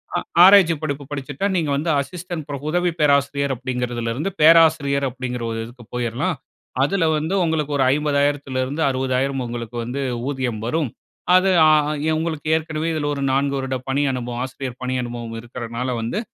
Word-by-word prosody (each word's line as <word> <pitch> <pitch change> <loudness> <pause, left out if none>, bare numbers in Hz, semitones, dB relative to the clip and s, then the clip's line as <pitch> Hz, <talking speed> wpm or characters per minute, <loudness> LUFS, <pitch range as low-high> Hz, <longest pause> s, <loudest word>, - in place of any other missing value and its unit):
அ - - +2 0.2
ஆராய்ச்சி 190 -4 +7
படிப்பு 140 -1 -3
படிச்சிட்டா, 145 +6 -3
நீங்க 155 -4 0
வந்து 155 +4 -2
அசிஸ்டன்ட் 175 0 -6
ப்ரப் 140 0 -5
"உதவி 175 0 +1
பேராசிரியர்" 140 -1 +2
அப்பிடிங்கிறதுல 125 -2 -3
இருந்து, 155 +9 -2
"பேராசிரியர்" 155 -4 +5
அப்பிடிங்கிற 125 -1 -5
ஒரு 115 - -3
இதுக்கு 120 +1 -13
போயிர்லாம். 125 +8 -1 0.5
அதுல 185 +2 +1
வந்து, 160 +5 -2
உங்களுக்கு 155 -2 -1
ஒரு 135 - +3
50,000த்துல 145 -3 0
இருந்து 145 +5 -4
60,000 130 0 -1
உங்களுக்கு 120 0 -6
வந்து 130 +4 -4 0.3
ஊதியம் 130 -6 -2
வரும். 150 +1 0 0.5
அது 190 +1 +4 0.2
ஆ - - +6 0.4
எ - - +2
உங்களுக்கு 160 -2 -3
ஏற்கனவே 160 0 -2
இதுல 150 -2 -2
ஒரு 140 - -4
4 140 +1 +1
வருட 130 0 -2
பணி 140 +2 +1
அனுபவம், 120 -1 -4
ஆசிரியர் 130 -1 -7
பணி 130 0 -1
அனுபவம் 120 -1 -6
இருக்குறனால 120 +1 -4
வந்து, 115 - -2
140 Hz, 160 wpm, -21 LUFS, 125-155 Hz, 0.5 s, ஆராய்ச்சி